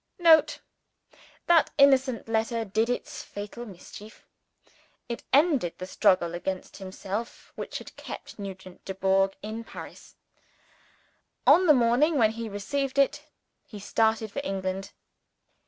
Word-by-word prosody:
[Note. 325 -4 +5 0.8
That 340 -2 +4
innocent 270 -4 +4
letter 225 +1 -1
did 220 +4 0
its 245 - -3
fatal 210 +4 -8
mischief. 205 +2 -12 0.8
It 235 -1 -5
ended 280 - +3
the 185 - -6
struggle 185 -2 +2
against 185 +2 -5
himself 195 +3 -6
which - - -5
had - - -11
kept - - -9
Nugent 190 -2 -9
Dubourg 195 0 +1
in 220 +2 -5
Paris. - - -11 1.3
On 365 +1 +6
the 300 - +7
morning 255 +6 +3
when 220 -4 +4
he 225 0 -6
received 265 +7 -3
it, 290 +2 +2 0.4
he 210 - -11
started 220 +1 0
for 280 - -3
England. 190 -3 -3
220 Hz, 120 wpm, -27 LUFS, 195-270 Hz, 1.3 s, the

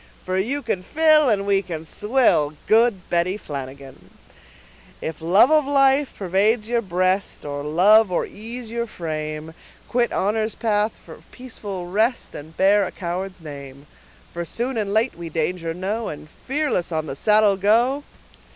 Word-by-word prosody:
For 185 - -2
you 255 +10 -1
can 210 -6 -2
fill, 305 +5 +4
and 200 -3 +1
we 200 -1 +3
can 165 -4 -7
swill, 210 - +1
Good 220 -4 +3
Betty 175 +3 +1
Flanagan. 135 -5 -9 0.9
If 160 0 -6
love 190 - +5
of 305 -2 +4
life 275 0 +3
pervades 205 +4 +1
your 235 0 +1
breast, 185 -1 -1
Or 145 -1 -4
love 195 +8 +5
of 175 - 0
ease 230 +3 -8
your 235 0 -2
frame, 155 -4 -5 0.3
Quit 240 -1 +1
honor's 215 +2 -1
path 215 -1 0
for - - -12
peaceful 205 -7 -7
rest, 220 +7 0
And 155 +2 -10
bear 200 +2 +4
a - - -7
coward's 185 0 -5
name; 140 -2 -10 0.5
For 170 - -3
soon 240 +9 -3
and 210 -3 -2
late, 220 +4 +1
we 170 -1 -8
danger 165 +1 -2
know, 200 +6 -3
And 150 0 -7 0.2
fearless 270 - -1
on 155 -1 -1
the 135 - -5
saddle 210 +4 +4
go. 235 +8 +2
200 Hz, 155 wpm, -22 LUFS, 170-230 Hz, 0.9 s, love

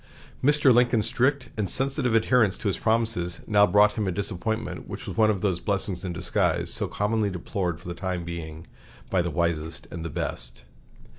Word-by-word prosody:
Mr. 145 -1 +5
Lincoln's 120 -2 +3
strict 130 +2 +1
and 105 -3 -2
sensitive 135 -3 +1
adherence 115 -3 +3
to - - -4
his 95 - -1
promises 110 -7 0
now 105 -1 +4
brought 105 +1 +5
him 105 -1 -2
a - - 0
disappointment 100 +3 -3
which - - -7
was - - -6
one 110 -1 +4
of 100 -4 0
those 95 -4 0
blessings 100 -2 -2
in 90 - -3
disguise 85 - +1
so - - 0
commonly 105 0 0
deplored 90 -2 -3
for 85 - -13
the 85 - -3
time 90 -1 -3
being 80 -1 -7 0.5
by 95 - +3
the 85 - -2
wisest 80 0 -2
and 85 -1 -5
best. 65 -7 -4
100 Hz, 180 wpm, -26 LUFS, 85-110 Hz, 0.5 s, Mr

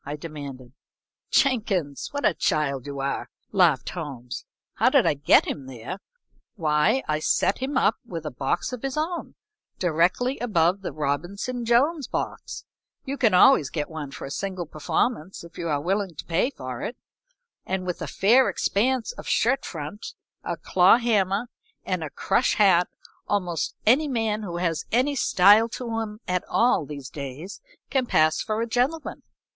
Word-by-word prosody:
I 145 +2 -5
demanded. 140 -5 -8 0.6
"Jenkins, 200 - +1
what 285 0 -2
a 205 - +4
child 140 -5 0
you 140 -1 -5
are!" 140 - -3 0.2
laughed 170 - +3
Holmes. 135 -8 -6 0.3
"How - - +4
did - - +4
I - - +3
get 145 0 +4
him 135 -3 -5
there? 130 - -7 0.6
Why, 155 - +2
I 155 0 0
set 175 - +1
him 265 +1 -2
up 220 - +3
with 165 -8 -7
a 150 - -3
box 135 - -2
of 250 - -5
his 270 +1 -3
own, 335 +3 -3 0.4
directly 180 - +1
above 190 -5 +1
the 195 - -4
Robinson 175 - -3
Jones 270 +5 +2
box - - -5 0.4
you 270 - -3
can 225 -8 +3
always 180 - +6
get 150 -1 -4
one 155 -3 -5
for - - -8
a 135 - -7
single 185 +1 -3
performance 165 +4 -2
if 170 - -12
you 170 - -3
are 145 -2 +1
willing 190 +2 -1
to - - -7
pay 175 +9 +1
for 130 - -7
it 245 - -5 0.7
and 185 0 -3
with 180 -1 -4
a - - -3
fair 240 +7 +4
expanse 255 - 0
of - - -10
shirt 260 +4 +2
front, 160 +6 -7 0.3
a - - -3
claw 185 +4 +5
hammer 210 -3 +1 0.4
and - - -1
a - - -4
crush - - +1
hat 185 -4 +5 0.4
almost 180 -5 -1
any 265 +8 +4
man 225 -5 -1
who 175 -5 -5
has 165 -3 -1
any 260 +5 +2
style 210 -1 +5
to 230 -1 -4
him 210 -1 -5
at 180 0 0
all 235 - +2
these 140 -3 -7
days 145 +6 -7 0.3
can 260 -2 +1
pass 155 -5 +3
for 215 0 -2
a - - 0
gentleman. 255 +7 -1
185 Hz, 170 wpm, -25 LUFS, 150-235 Hz, 0.7 s, always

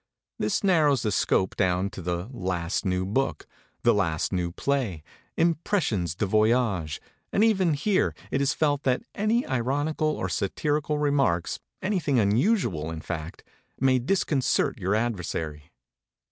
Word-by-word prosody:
This 105 - 0
narrows 155 - +3
the 105 - 0
scope 95 -1 +1
down 95 0 +1
to - - -8
the 90 +2 -3
"last 90 -3 -2
new 90 0 0
book," 130 +8 -1 0.4
"the - - +5
last 85 -6 0
new 90 -2 -1
play," 115 - -1 0.3
"impressions 160 - +1
de 105 - 0
voyage," 110 - +1 0.3
and 205 - +3
even 190 -8 +3
here 185 +7 +1 0.2
it 135 - +1
is 140 -1 +2
felt 145 -2 +1
that 130 -2 0
any 215 +4 +1
very 145 - -5
ironical 145 +5 0
or 150 -11 -1
satirical 145 - -1
remarks, 135 - +1 0.2
anything 180 -9 +1
unusual, 105 - +2
in 80 -1 -5
fact, 80 -1 -6 0.4
may 130 -1 +3
disconcert 135 - +1
your 95 +2 0
adversary. 85 -9 -3
120 Hz, 140 wpm, -26 LUFS, 90-150 Hz, 0.4 s, the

